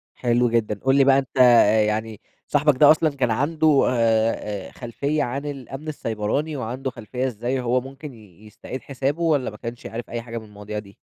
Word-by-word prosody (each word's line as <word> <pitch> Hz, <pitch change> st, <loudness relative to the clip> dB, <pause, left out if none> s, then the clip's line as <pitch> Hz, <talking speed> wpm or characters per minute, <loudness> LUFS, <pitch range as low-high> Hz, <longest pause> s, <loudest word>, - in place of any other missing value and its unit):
حلو 120 Hz, 0 st, +1 dB
جدًا، 110 Hz, -3 st, 0 dB
قل 135 Hz, +1 st, +4 dB
لي 140 Hz, -, +6 dB
بقى 135 Hz, 0 st, +5 dB
أنت، 135 Hz, 0 st, -7 dB
آآ، 115 Hz, -4 st, +6 dB
يعني 110 Hz, 0 st, -2 dB, 0.3 s
صاحبك 145 Hz, -2 st, +2 dB
ده 145 Hz, +2 st, +8 dB
أصلًا 155 Hz, 0 st, +3 dB
كان 125 Hz, -4 st, 0 dB
عنده، 150 Hz, +3 st, +2 dB
آآ، 110 Hz, -4 st, 0 dB
آآ، -, -, -14 dB
خلفية 140 Hz, +5 st, -2 dB
عن 140 Hz, +4 st, -4 dB
الأمن 140 Hz, +1 st, -7 dB
السيبراني 140 Hz, +3 st, -2 dB
وعنده 130 Hz, +2 st, -4 dB
خلفية 125 Hz, +2 st, -4 dB
إزاي 125 Hz, +2 st, -2 dB
هو 125 Hz, +1 st, +1 dB
ممكن 135 Hz, +2 st, -10 dB
ي 105 Hz, -3 st, -17 dB
يستعيد 120 Hz, +5 st, -8 dB
حسابه، 140 Hz, +4 st, -3 dB
والّا 150 Hz, -6 st, +1 dB
ما 105 Hz, -, -11 dB
كنش 115 Hz, +1 st, -8 dB
عارف 115 Hz, +1 st, -6 dB
أي 120 Hz, 0 st, -4 dB
حاجة 115 Hz, 0 st, -7 dB
من 110 Hz, -, -7 dB
المواضيع 105 Hz, 0 st, -7 dB
دي؟ 100 Hz, -2 st, -14 dB
125 Hz, 195 wpm, -23 LUFS, 110-140 Hz, 0.3 s, ده